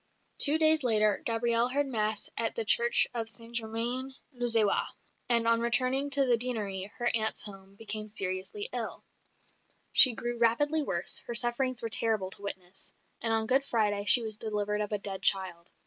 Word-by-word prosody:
Two 300 +1 +6
days 315 -1 +4
later 215 -4 +2
Gabrielle 235 +1 +1
heard 285 +3 0
Mass 220 -5 -3
at - - 0
the 460 -2 -2
Church 475 0 +3
of 225 -2 -4
St 230 +1 -10
Germain 240 +4 -5 0.2
l'Auxerrois; 230 -4 -1 0.4
and 235 -1 +2
on 230 0 +1
returning 255 +4 -1
to 280 -1 +2
the 245 -2 +2
Deanery, 210 -5 -3
her 240 -1 +1
aunt's 220 -1 -1
home, 195 -1 -10
became 215 0 -1
seriously 195 - -4
ill. - - -6 0.9
She 255 - +8
grew 240 0 -6
rapidly 290 +7 +2
worse; 175 -10 +1
her 235 - -3
sufferings 240 +1 +3
were 230 - -4
terrible 215 -4 0
to 200 - -7
witness; 190 -2 -7 0.3
and 225 - 0
on 225 0 -1
Good 265 +4 +1
Friday 210 -6 -2
she 235 +3 +6
was 215 -1 -4
delivered 210 -1 -4
of 210 - -5
a 210 - -2
dead 195 -1 -6
child. 185 -3 0
230 Hz, 175 wpm, -27 LUFS, 210-250 Hz, 0.9 s, She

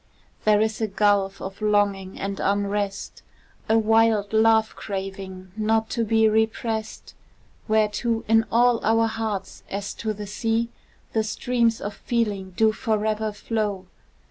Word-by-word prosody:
There 210 -1 +5
is 220 0 -1
a 220 - +1
gulf 200 -1 +1
of 195 +2 -7
longing 200 -2 +1
and 195 0 -3
unrest, 200 0 -1 0.5
A 220 - +5
wild 220 -1 +3
love 220 0 +4
craving 190 -2 -6
not 220 +1 0
to 235 - 0
be 220 0 +3
represt, 220 0 -1 0.5
Whereto, 220 +1 +1
in 225 0 +4
all 240 0 +3
our 225 +1 +3
hearts, 220 -3 -4
as 200 0 -4
to 220 - -1
the 210 0 -6
sea, 225 +3 -1 0.4
The 220 - +2
streams 235 +1 0
of 205 - -5
feeling 205 -4 -2
do 220 -1 +4
forever 215 -1 -1
flow. 210 -2 -3
215 Hz, 135 wpm, -24 LUFS, 200-225 Hz, 0.5 s, There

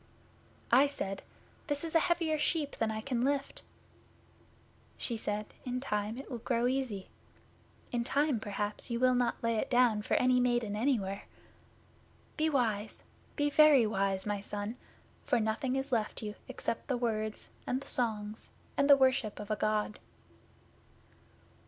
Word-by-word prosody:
'I 265 +4 +7
said, 195 -8 -4 0.5
"This 290 0 -2
is 330 - -4
a 330 - +6
heavier 325 -2 +1
sheep 295 -2 0
than 225 - +1
I 220 0 -3
can 245 -1 -1
lift." 280 +1 -1 1.4
She 235 - -2
said, 210 -1 -1 0.2
"In 250 0 -2
time 210 -3 -2
it 270 - -8
will 240 - -4
grow 235 0 0
easy. 250 -7 -1 0.8
In 240 -1 0
time 280 0 +1
perhaps 205 +1 -3
you 235 -1 -1
will 255 0 +4
not 245 -1 0
lay 230 -1 +1
it - - -1
down 245 -4 +4
for - - 0
any 250 0 +4
maiden 240 -4 +1
anywhere. 210 -5 0 1.1
Be 315 0 +2
wise 225 -7 0 0.3
be 290 -1 +1
very 295 -5 +7
wise, 195 -2 0
my 205 -1 -1
son, 205 +2 -4 0.5
for 245 - +2
nothing 225 +4 0
is 270 +1 -2
left 225 -2 -1
you 210 -1 -4
except 255 -3 -4
the 260 -3 0
words, 215 -3 -2 0.2
and 255 - 0
the 275 - -12
songs, 215 -3 -2 0.3
and 280 +1 +3
the 280 - +9
worship 260 -5 +2
of 210 0 -6
a - - +2
God." 215 0 0
240 Hz, 155 wpm, -32 LUFS, 215-270 Hz, 1.4 s, the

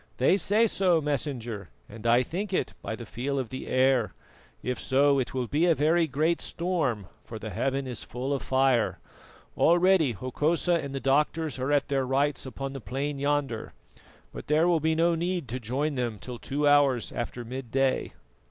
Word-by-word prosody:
"They 130 +8 +4
say 205 +4 +3
so, 185 -5 +2
Messenger, 125 - -3 0.2
and 110 +2 -7
I 120 +2 +5
think 190 - -4
it 135 - 0
by 110 - -4
the 115 - -9
feel 135 +6 -3
of 130 -4 -2
the 130 - -6
air. 130 -3 +2 0.5
If 125 +1 -2
so, 140 +1 +3
it 130 - -3
will 130 -1 0
be 150 +9 +1
a 165 - +4
very 160 +3 +3
great 155 +4 0
storm, 160 - -1 0.2
for 115 - -8
the 110 0 -6
heaven 135 +8 -1
is 125 -3 -5
full 130 +3 -3
of 140 - -2
fire. 130 -3 +2 0.6
Already 175 -5 +4
Hokosa 150 - 0
and 140 -1 -5
the - - -1
doctors 150 +1 +1
are 130 +3 -1
at 145 -1 +2
their 135 -2 0
rites 135 +2 0
upon 135 +1 -5
the 135 - -7
plain 140 +5 -3
yonder, 140 -5 -1 0.6
but - - -8
there 155 +3 +3
will 170 -2 +3
be 160 +1 +1
no 170 +1 +3
need 170 -2 -2
to 125 +3 -3
join 135 +6 -1
them 120 -5 -2
till 120 +3 -8
two 145 +2 -1
hours 140 -4 +3
after 120 0 -5
midday." 130 +2 -1
135 Hz, 185 wpm, -27 LUFS, 125-155 Hz, 0.6 s, I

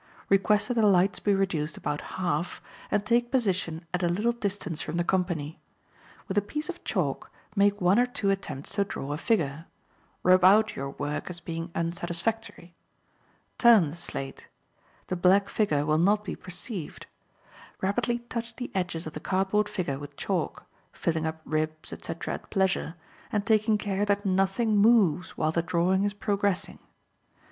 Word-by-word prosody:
Request 205 +2 +3
that - - +2
the 230 - +2
lights 190 0 +3
may - - +6
be - - +4
reduced 165 -6 -1
about 145 +1 -3 0.2
half, 175 -2 -1 0.3
and 205 0 0
take 240 +2 +2
position 185 -9 0
at 180 - 0
a 175 - +2
little 210 +7 +1
distance 200 -8 -3
from 160 +2 -4
the 175 - +2
company. 175 -4 -1 0.7
With 200 -1 +2
a - - -2
piece 300 - -4
of 355 - -6
chalk - - -2 0.2
make 205 0 +3
one 185 +5 +4
or 250 - +4
two 205 -5 0
attempts 155 -8 -4
to 200 0 +1
draw 145 -7 -5
a - - -3
figure; 165 -8 0 0.6
rub 185 0 +5
out 210 +3 +6
your 135 0 -4
work 145 +4 -4
as 175 -1 -6
being 165 0 -5
unsatisfactory; 175 +3 -3 0.9
turn 220 - +6
the - - -8
slate; 135 -5 -6 0.6
the 185 - -2
black 190 +3 +4
figure 150 -9 +1
will 155 0 +2
not 205 +4 +3
be 210 - -4
perceived; 180 -1 -7 0.7
rapidly 200 +5 0
touch 235 -1 -4
the 250 - -6
edges 175 -3 -2
of 155 - -6
the - - -5
cardboard 195 +4 +1
figure 145 -8 -2
with 145 -1 -10
chalk, - - -2 0.3
filling 160 -1 -1
up 160 0 -5
ribs, 155 0 -2
etc., 165 0 -5
at - - -8
pleasure, 190 -4 0 0.4
and 205 -1 0
taking 215 -1 +3
care 205 -1 -1
that 205 0 +1
nothing 195 +4 +2
moves 200 -6 +4
while 155 - +1
the 170 - +1
drawing 180 +3 +1
is 205 0 0
progressing. 200 -2 -1
185 Hz, 170 wpm, -28 LUFS, 165-205 Hz, 0.9 s, may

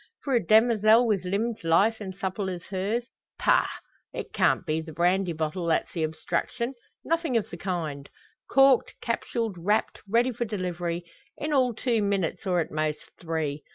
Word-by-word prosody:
For 275 - -1
a 235 -4 +3
demoiselle 220 +3 +5
with 200 -5 0
limbs 210 +4 -1
lithe 195 +7 +3
and 190 -2 -6
supple 190 +1 -3
as 175 -2 -5
hers 200 +5 -1 0.3
pah! - - +3 0.4
It - - -6
can't - - +2
be 155 +1 0
the 160 0 -9
brandy 180 +3 +1
bottle 160 +2 -2
that's 160 - +1
the 170 - -2
obstruction. 170 +10 -2 0.3
Nothing 330 -6 +1
of 220 -1 -2
the 170 - -6
kind. 160 -7 -4 0.4
Corked, 270 -2 +4
capsuled, 230 -4 -2
wrapped, 205 +6 0
ready 235 +4 +3
for 240 0 -3
delivery 175 -4 -3 0.3
in 300 +1 -2
all 255 -4 +3
two 230 -1 +1
minutes, 200 -1 -1
or 180 -1 +2
at - - -5
most, 155 0 -2
three! 160 -3 -2
195 Hz, 165 wpm, -27 LUFS, 170-230 Hz, 0.4 s, demoiselle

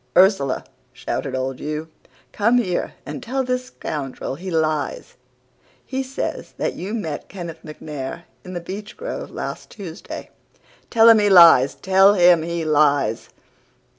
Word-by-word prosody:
"'Ursula!' 180 -8 +3 0.3
shouted 130 - -4
old 130 0 -3
Hugh, 155 +1 -4 0.4
'come 230 +4 +2
here 185 -8 -1
and 275 - -6
tell 265 +2 -2
this 250 0 -2
scoundrel 140 - -5
he 180 +7 -7
lies. 160 - -1 0.7
He 265 0 -3
says 265 0 -5
that - - -1
you 200 +5 -5
met 160 -10 -5
Kenneth 170 -4 -7
MacNair 150 0 -7 0.2
in 185 - -9
the 175 - -4
beechgrove 215 - -7
last - - -6
Tuesday. 190 -4 -9 0.6
Tell 225 -1 +5
him 225 -1 +8
he 205 0 +3
lies! 170 -8 +7
Tell 190 +2 +4
him 175 -3 +6
he 170 0 -3
lies! 145 -7 +2
175 Hz, 135 wpm, -21 LUFS, 155-215 Hz, 0.7 s, him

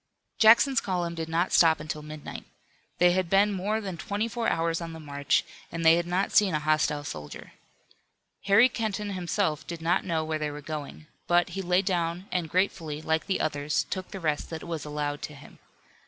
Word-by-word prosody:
Jackson's 235 +5 +6
column 175 -3 -2
did 165 -1 -5
not 170 +3 0
stop 160 -3 +5
until 150 0 -5
midnight. 150 0 -8 0.5
They 180 0 +5
had 185 -1 0
been 200 +2 +4
more 205 +3 -1
than 190 -5 -5
twenty 205 +6 -2
four 230 0 -2
hours 165 +1 0
on 165 -1 -6
the 160 - -8
march, 140 -2 0 0.3
and 165 0 -4
they 160 - +8
had 175 0 -1
not 185 +3 0
seen 195 -6 +4
a - - +1
hostile 150 -1 +1
soldier. 75 - -8 0.9
Harry 200 +5 +6
Kenton 215 -4 -3
himself 175 -4 -1
did 170 -1 -5
not 170 +3 +1
know 160 -3 -1
where 155 0 -2
they 150 -1 -1
were 145 0 -7
going. 150 0 -7 0.2
But 175 +1 +3
he 190 +2 -4
lay 180 +1 +2
down 175 -1 -1
and 175 -3 -1
gratefully, 165 -4 -1
like 160 +2 -1
the 190 -2 0
others, 145 0 0
took 185 -1 -4
the 195 - -7
rest 155 -4 -1
that 160 -1 -6
was 165 -3 -5
allowed 145 -1 -3
to 150 - -6
him. 140 - -15
170 Hz, 200 wpm, -27 LUFS, 155-190 Hz, 0.9 s, they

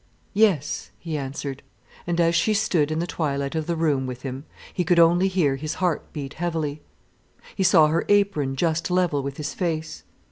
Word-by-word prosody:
"Yes," 195 -9 +1
he 165 -2 -5
answered, 140 -1 -5 0.5
and 175 0 -1
as 170 0 +3
she 215 +5 +2
stood 180 -8 +1
in 155 - -2
the 170 - 0
twilight 140 -5 -2
of 160 -1 -2
the 170 - 0
room 145 -5 +1
with 125 0 -7
him, 135 +1 -5 0.3
he 180 - 0
could 175 0 +2
only 170 +3 +5
hear 165 -8 +1
his 155 +3 -4
heart 180 -4 -1
beat 140 -3 -6
heavily. 160 -3 -3 0.7
He - - -3
saw 170 -4 +6
her 160 +2 +1
apron 200 -10 +2
just 165 +4 0
level 180 -5 +1
with 140 0 -5
his 150 -1 -4
face. 160 -3 -3
160 Hz, 185 wpm, -24 LUFS, 145-175 Hz, 0.7 s, saw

